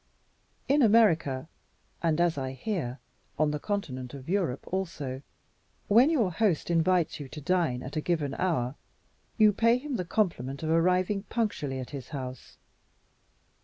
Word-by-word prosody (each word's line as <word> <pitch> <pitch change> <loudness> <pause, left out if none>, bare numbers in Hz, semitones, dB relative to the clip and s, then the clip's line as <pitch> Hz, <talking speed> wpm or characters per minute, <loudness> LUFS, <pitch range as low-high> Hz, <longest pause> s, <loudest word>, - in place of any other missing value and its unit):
In 285 +2 +4
America, 170 - +4 0.5
and 165 -1 +1
(as 175 -1 +3
I 130 -2 -3
hear) 135 - -3 0.4
on 155 0 +2
the 150 - -2
continent 140 - -4
of 135 -1 -10
Europe 175 -8 0
also, 150 -8 -3 0.7
when 235 +8 +6
your 240 - +2
host 175 -3 +1
invites 170 -1 +2
you 140 -2 -7
to 150 - -8
dine 160 -6 0
at 130 - -7
a 155 - 0
given 150 -5 -1
hour, 135 -9 0 0.6
you 215 -2 +6
pay 230 +3 +4
him 270 -1 -4
the 180 - -1
compliment 160 - -1
of 160 - 0
arriving 180 +4 +2
punctually 205 - -1
at 130 -1 -6
his 135 -3 -7
house. 130 -4 -7
165 Hz, 150 wpm, -28 LUFS, 135-200 Hz, 0.7 s, when